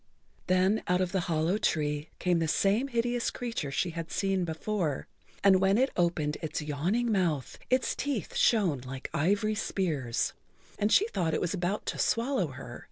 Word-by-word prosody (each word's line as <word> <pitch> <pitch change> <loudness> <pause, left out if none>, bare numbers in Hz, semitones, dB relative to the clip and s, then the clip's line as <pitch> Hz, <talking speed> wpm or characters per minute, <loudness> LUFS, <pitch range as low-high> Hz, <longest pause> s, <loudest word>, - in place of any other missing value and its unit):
Then 185 +4 +3
out 180 0 +2
of 185 -1 0
the 190 - +1
hollow 165 +5 +1
tree 150 -3 0
came 180 -2 +1
the 165 - 0
same 200 - +2
hideous 240 -1 0
creature 230 - -4
she 170 +5 -1
had 165 0 -5
seen 195 -2 0
before, 165 -2 -2 0.4
and 190 -2 +6
when 195 +2 +4
it 265 +2 +2
opened 165 -4 0
its 160 - -3
yawning 175 +11 0
mouth 170 - 0
its 255 0 +2
teeth 260 - -3
shone 190 - +3
like 130 +1 -7
ivory 205 +7 +2
spears, 155 - -1 0.5
and 210 +1 +1
she 420 - +5
thought 165 - 0
it - - +1
was 175 - -1
about 190 +2 -2
to - - -3
swallow 235 - +1
her. 130 -3 -9
185 Hz, 170 wpm, -29 LUFS, 155-215 Hz, 0.5 s, and